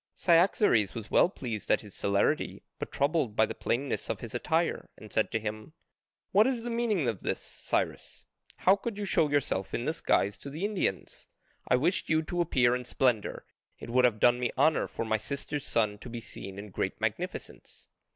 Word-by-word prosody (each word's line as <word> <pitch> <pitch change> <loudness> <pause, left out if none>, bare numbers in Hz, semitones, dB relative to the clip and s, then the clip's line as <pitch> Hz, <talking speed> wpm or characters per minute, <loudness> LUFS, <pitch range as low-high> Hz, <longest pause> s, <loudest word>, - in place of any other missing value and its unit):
Cyaxares 170 - +3
was 110 -2 -7
well - - +5
pleased 120 - -6
at - - +3
his 105 -3 -12
celerity, 100 0 0 0.2
but - - -5
troubled 140 -6 0
by 110 - +5
the - - -5
plainness 130 +3 -2
of - - -2
his - - -8
attire, - - 0
and - - -11
said - - +2
to 110 - 0
him, 110 +6 -6 0.6
"What 210 +4 +5
is 250 -3 -1
the 240 - -3
meaning 225 - +1
of 110 -5 -1
this, - - -2
Cyrus? - - -3 0.3
How 190 - +4
could 205 +1 -5
you 205 - -3
show 160 -5 +2
yourself 140 -9 0
in 120 - -2
this 160 +3 -2
guise 100 +1 +2
to 140 - -8
the 155 +8 -3
Indians? 195 - -2 0.4
I - - +4
wished 165 +9 0
you 160 0 +3
to 175 +2 -1
appear 125 -7 +3
in 125 - -3
splendour: 120 -4 0 0.3
it - - -8
would 125 +1 +5
have 110 -3 +2
done 120 +2 +5
me 125 - 0
honour 155 +3 +3
for 115 - -4
my 110 0 +1
sister's 140 +4 -4
son 105 -3 +1
to 125 - -9
be 120 0 -5
seen 95 -3 -8
in 100 0 -8
great - - -2
magnificence." - - -5
125 Hz, 200 wpm, -29 LUFS, 110-170 Hz, 0.6 s, well